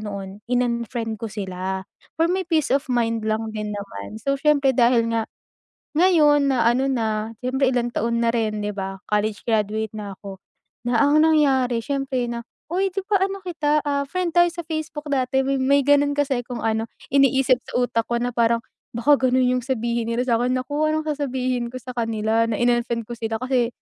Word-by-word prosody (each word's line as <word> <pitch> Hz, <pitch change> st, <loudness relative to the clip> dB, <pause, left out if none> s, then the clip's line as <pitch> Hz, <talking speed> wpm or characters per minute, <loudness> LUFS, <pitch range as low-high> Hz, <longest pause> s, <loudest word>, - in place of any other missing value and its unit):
noon 200 Hz, -1 st, -7 dB
in-unfriend 235 Hz, -2 st, -1 dB
ko 230 Hz, -, -3 dB
sila, 190 Hz, -2 st, -4 dB, 0.3 s
for 330 Hz, -, +5 dB
my 375 Hz, +1 st, 0 dB
peace 320 Hz, -4 st, +1 dB
of 275 Hz, +2 st, +2 dB
mind 230 Hz, -2 st, 0 dB
lang 220 Hz, +1 st, -1 dB
din 210 Hz, -1 st, -3 dB
naman 200 Hz, -, -7 dB
so 275 Hz, +4 st, 0 dB
siyempre 285 Hz, -2 st, +3 dB
dahil 235 Hz, -1 st, +4 dB
nga, 225 Hz, -1 st, 0 dB, 0.7 s
ngayon 300 Hz, -5 st, +4 dB
na 250 Hz, -3 st, +2 dB
ano 260 Hz, +3 st, +1 dB
na 220 Hz, -2 st, -1 dB
siyempre 265 Hz, +2 st, +1 dB
ilang 240 Hz, -1 st, 0 dB
taon 235 Hz, +1 st, 0 dB
na 230 Hz, -, +3 dB
rin 215 Hz, -2 st, -1 dB
'di 210 Hz, -, -2 dB
ba, 195 Hz, -1 st, -5 dB
college 210 Hz, 0 st, 0 dB
graduate 220 Hz, -1 st, 0 dB
na 205 Hz, -2 st, -6 dB
ko, 195 Hz, -1 st, -8 dB, 0.5 s
na 240 Hz, -, +1 dB
ang 290 Hz, +2 st, +4 dB
nangyari 270 Hz, -6 st, +3 dB
siyempre 270 Hz, -1 st, -1 dB
na 235 Hz, 0 st, -5 dB, 0.3 s
'di 385 Hz, +2 st, 0 dB
ba, 410 Hz, -2 st, +3 dB
ano 390 Hz, 0 st, -3 dB
kita, 305 Hz, -4 st, 0 dB
ah, 280 Hz, -1 st, 0 dB
friend 360 Hz, +2 st, -2 dB
tayo 345 Hz, 0 st, +6 dB
sa 345 Hz, 0 st, -6 dB
Facebook 315 Hz, -1 st, -5 dB
dati 265 Hz, 0 st, +1 dB
may 275 Hz, +1 st, +2 dB
ganun 285 Hz, 0 st, +4 dB
kasi 280 Hz, -3 st, +1 dB
kung 245 Hz, -2 st, -5 dB
ano 225 Hz, 0 st, 0 dB, 0.2 s
iniisip 270 Hz, -1 st, +4 dB
sa -, -, -10 dB
utak 230 Hz, -2 st, -1 dB
ko 235 Hz, -, 0 dB
na 245 Hz, -, -1 dB
parang 230 Hz, 0 st, +3 dB, 0.4 s
baka 260 Hz, +2 st, +3 dB
ganun 255 Hz, +1 st, +3 dB, 0.2 s
yung -, -, -10 dB
sabihin 235 Hz, -2 st, -1 dB
nila 240 Hz, +2 st, 0 dB
sa'kin 245 Hz, +1 st, +2 dB
naku 275 Hz, +3 st, -3 dB
ano 310 Hz, 0 st, 0 dB
sasabihin 260 Hz, -5 st, -2 dB
ko -, -, -10 dB
sa 255 Hz, +1 st, -8 dB
kanila 225 Hz, -1 st, +1 dB
na 230 Hz, -, -1 dB
in-unfriend 240 Hz, -1 st, +1 dB
ko -, -, -9 dB
sila 225 Hz, -1 st, -3 dB
kasi, 255 Hz, -2 st, +1 dB
245 Hz, 185 wpm, -23 LUFS, 225-285 Hz, 0.7 s, tayo